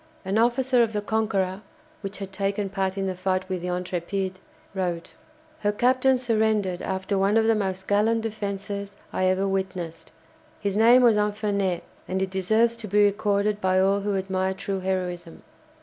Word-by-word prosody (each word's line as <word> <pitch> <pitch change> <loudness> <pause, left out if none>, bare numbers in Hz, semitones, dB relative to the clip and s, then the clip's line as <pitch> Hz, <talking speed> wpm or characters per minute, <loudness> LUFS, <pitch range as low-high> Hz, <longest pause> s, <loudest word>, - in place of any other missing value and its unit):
An 195 +3 +1
officer 245 +2 +3
of 225 -1 +1
the 210 - -1
"Conqueror" 205 -3 0 0.4
(which 200 -1 -6
had 195 -1 -6
taken 195 +1 -1
part 190 -1 -2
in 195 - -1
the 190 - -1
fight 185 0 -1
with 185 -2 -3
the 180 - -4
"Intrépide") 180 +1 -2 0.4
wrote: 175 -3 -3 0.5
"Her 205 - +1
captain 255 +4 +3
surrendered 220 -6 +1
after 190 +1 -2
one 200 +3 +3
of 225 - +3
the 225 - +4
most 190 -3 -2
gallant 220 +3 +2
defences 200 -2 -4 0.2
I 185 - +1
ever 185 +1 +2
witnessed. 185 -4 -4 0.5
His 200 -1 -2
name 235 +4 +6
was 230 -3 +5
Infernet, 205 -4 0 0.2
and 190 +1 -1
it 190 0 -1
deserves 220 +5 +2
to 225 -2 -6
be 205 +1 +4
recorded 205 +1 +1
by 185 0 +3
all 195 +1 +3
who 200 0 -1
admire 190 0 -1
true 195 0 -3
heroism. 180 -2 -3
195 Hz, 170 wpm, -25 LUFS, 190-215 Hz, 0.5 s, name